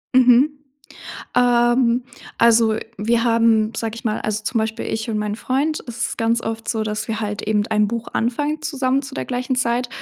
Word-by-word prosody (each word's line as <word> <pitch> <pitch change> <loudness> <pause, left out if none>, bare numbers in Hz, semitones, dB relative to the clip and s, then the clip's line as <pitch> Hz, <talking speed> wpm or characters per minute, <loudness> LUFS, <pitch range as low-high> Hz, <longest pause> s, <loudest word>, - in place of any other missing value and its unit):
Mhm. 260 +4 +5 0.8
Ähm, 240 0 +3 0.3
also, 230 -1 +4 0.2
wir 230 +2 +1
haben, 230 -2 +3
sage 225 0 -3
ich 230 - -9
mal 215 -1 -1
also, 215 0 -2
zum 230 - -1
Beispiel 220 0 -3
ich 220 +1 -3
und 215 - -1
mein 210 0 -2
Freund 285 +6 -1
es 235 0 -3
ist - - -7
ganz 230 0 +1
oft 225 0 -5
so, 220 -2 -1
dass 215 0 -3
wir 225 -1 -3
halt 210 -1 -3
eben 210 -1 +1
ein 210 -1 +2
Buch 230 +1 -4
anfangen 290 +7 -1
zusammen 270 -3 0
zu 270 -1 -9
der - - -2
gleichen 255 +1 -2
Zeit 245 0 0
230 Hz, 190 wpm, -21 LUFS, 220-250 Hz, 0.8 s, Mhm